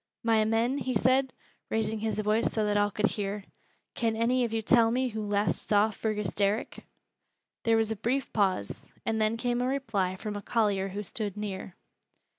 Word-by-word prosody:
"My 225 -1 +4
men," 230 +5 +1
he 255 -2 -2
said, 260 +4 +3 0.4
raising 220 0 0
his 220 0 -2
voice 215 +2 +1
so 215 -1 0
that 210 0 +1
all 205 0 +3
could 210 +1 0
hear, 205 -1 -2 0.5
"can 225 -1 0
any 245 +3 +2
of 235 - -1
you 225 0 -1
tell 230 0 +5
me 255 +2 +1
who 220 -1 -4
last 205 0 0
saw 210 +1 +4
Fergus 210 -2 -2
Derrick?" 205 +3 0 0.8
There 225 -1 +4
was 225 0 +1
a - - 0
brief 245 +5 -2
pause, 190 - 0 0.2
and 220 -1 0
then 215 +1 +1
came 245 +1 0
a 250 - +1
reply 225 -9 -1
from 210 +2 -5
a 205 - -4
collier 205 -4 +1
who 200 +2 -5
stood 205 +1 -4
near. 195 -3 -5
220 Hz, 190 wpm, -29 LUFS, 205-230 Hz, 0.8 s, tell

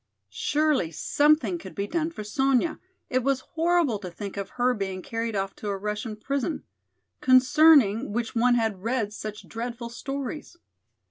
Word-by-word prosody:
Surely 295 - +1
something 305 - +2
could - - -10
be 200 - -2
done 320 +6 -1
for 270 -10 -7
Sonya, 270 +7 +1 0.3
it 255 - +1
was 270 0 +1
horrible 330 -8 +2
to 185 -3 -6
think 195 +3 -7
of 200 -1 -4
her 250 +1 +3
being 190 -4 -4
carried 225 -1 -3
off 195 0 -2
to 210 - -7
a 200 -1 -1
Russian 210 +2 -4
prison, 275 +7 -2 0.6
concerning 260 -4 +5
which 235 +1 -2
one 245 +1 +3
had 220 -5 0
read 225 -2 -1
such 215 0 -7
dreadful 235 +1 -5
stories. 275 +6 -6
240 Hz, 155 wpm, -26 LUFS, 210-285 Hz, 0.6 s, concerning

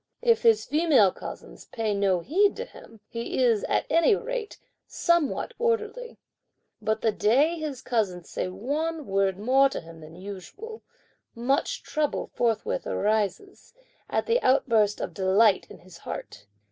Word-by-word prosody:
If 465 -2 +4
his 455 -2 +4
female 295 - +4
cousins - - -10
pay 220 -3 -2
no 195 -3 +1
heed 395 - +2
to 480 - -5
him, 225 - -15
he 235 +2 -2
is, 225 -4 +2
at - - 0
any 335 +6 +4
rate, 475 -1 -5 0.3
somewhat 340 -4 0
orderly, 465 +1 -1 0.6
but 220 +1 -1
the 225 - +2
day 280 +12 +2
his 295 -5 -5
cousins 195 -8 -1
say - - -3
one 290 - -3
word 195 -2 +1
more 265 +6 +4
to - - -4
him 165 0 -13
than 155 +1 -12
usual, 205 - -9 0.5
much 270 +6 0
trouble 305 -2 -2
forthwith 245 - -1
arises, 215 - -2 0.3
at - - 0
the 475 +1 +2
outburst 225 -5 +3
of - - -4
delight 195 +2 +3
in - - -11
his 175 -2 -15
heart. - - -8
250 Hz, 145 wpm, -26 LUFS, -, 0.6 s, If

